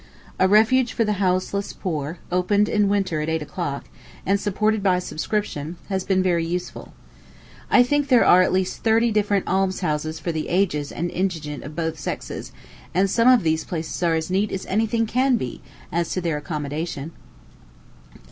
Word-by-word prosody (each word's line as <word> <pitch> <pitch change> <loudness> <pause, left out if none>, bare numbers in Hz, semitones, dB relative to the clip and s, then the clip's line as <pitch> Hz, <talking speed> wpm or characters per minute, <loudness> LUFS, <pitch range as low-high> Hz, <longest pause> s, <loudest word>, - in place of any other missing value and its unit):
A 185 - +5
refuge 225 +5 +4
for 230 - +1
the 210 -2 -1
houseless 185 +2 0
poor, 160 -3 -4
opened 200 +3 +2
in 210 -2 +2
winter 195 -6 0
at 155 - -2
eight 160 -1 -1
o'clock, 150 -3 -4 0.4
and 200 +1 +2
supported 215 +2 0
by 190 -2 +3
subscription, 175 -3 -3
has 190 -2 -1
been 190 -1 +1
very 175 -3 +2
useful. 175 +2 -5 0.8
I 245 - +6
think 290 +3 +1
there 255 -4 +5
are 180 - +7
at 185 - +2
least 185 0 -1
thirty 230 +1 +3
different 205 -2 +1
almshouses 175 -5 0
for 170 - -3
the 160 -1 -3
aged 170 -6 0
and 175 +1 -3
indigent 160 -6 -3
of 150 +2 -9
both 160 -2 -2
sexes; - - -5 0.4
and 190 +1 +2
some 230 +1 +3
of 255 -5 +6
these 160 -1 +1
places 165 0 -5
are 170 -2 +2
as 160 +2 -2
neat 200 +3 +1
as 190 - -4
any 220 +3 +1
thing 230 +1 +1
can 255 +3 +2
be, 125 - -5 0.3
as 170 +1 -1
to - - -1
their 165 -3 -1
accommodation. 150 0 -4
185 Hz, 175 wpm, -23 LUFS, 160-210 Hz, 0.8 s, are